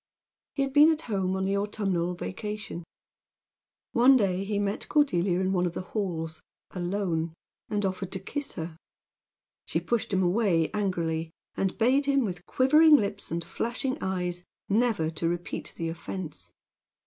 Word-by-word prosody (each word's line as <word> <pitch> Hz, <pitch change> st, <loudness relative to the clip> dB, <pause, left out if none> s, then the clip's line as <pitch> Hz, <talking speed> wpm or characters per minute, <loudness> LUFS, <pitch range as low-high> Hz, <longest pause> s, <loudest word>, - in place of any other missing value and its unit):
He 275 Hz, -, +2 dB
had 270 Hz, -1 st, -3 dB
been 300 Hz, +2 st, +8 dB
at 315 Hz, 0 st, -2 dB
home 190 Hz, -4 st, -1 dB
on 190 Hz, 0 st, -1 dB
the 195 Hz, +1 st, +1 dB
autumnal 195 Hz, -4 st, -1 dB
vacation. 210 Hz, -1 st, -5 dB, 1.1 s
One 260 Hz, +3 st, +6 dB
day 195 Hz, -4 st, +1 dB
he 205 Hz, +1 st, -2 dB
met 205 Hz, 0 st, -2 dB
Cordelia 185 Hz, -, +2 dB
in 190 Hz, 0 st, +1 dB
one 180 Hz, -1 st, +2 dB
of 170 Hz, -, -4 dB
the -, -, -3 dB
halls, 165 Hz, -6 st, -2 dB, 0.3 s
alone, 175 Hz, -3 st, -2 dB, 0.3 s
and 205 Hz, -1 st, 0 dB
offered 190 Hz, 0 st, -3 dB
to 190 Hz, -, -2 dB
kiss 285 Hz, +9 st, -4 dB
her. 160 Hz, 0 st, -6 dB, 0.9 s
She -, -, 0 dB
pushed 235 Hz, -3 st, -1 dB
him 190 Hz, -1 st, +2 dB
away 175 Hz, -3 st, +2 dB
angrily, 170 Hz, -5 st, -1 dB, 0.2 s
and 190 Hz, -1 st, -1 dB
bade 265 Hz, +5 st, +3 dB
him, 275 Hz, -3 st, +3 dB
with 180 Hz, -3 st, -5 dB
quivering 300 Hz, +4 st, +6 dB
lips 205 Hz, -5 st, 0 dB
and 170 Hz, +1 st, -1 dB
flashing 245 Hz, -, -2 dB
eyes, 180 Hz, -2 st, -2 dB, 0.2 s
never 210 Hz, -7 st, +2 dB
to 165 Hz, +1 st, -1 dB
repeat 175 Hz, 0 st, -4 dB
the 165 Hz, -1 st, -2 dB
offense. 165 Hz, -, -6 dB
190 Hz, 155 wpm, -28 LUFS, 175-225 Hz, 1.1 s, been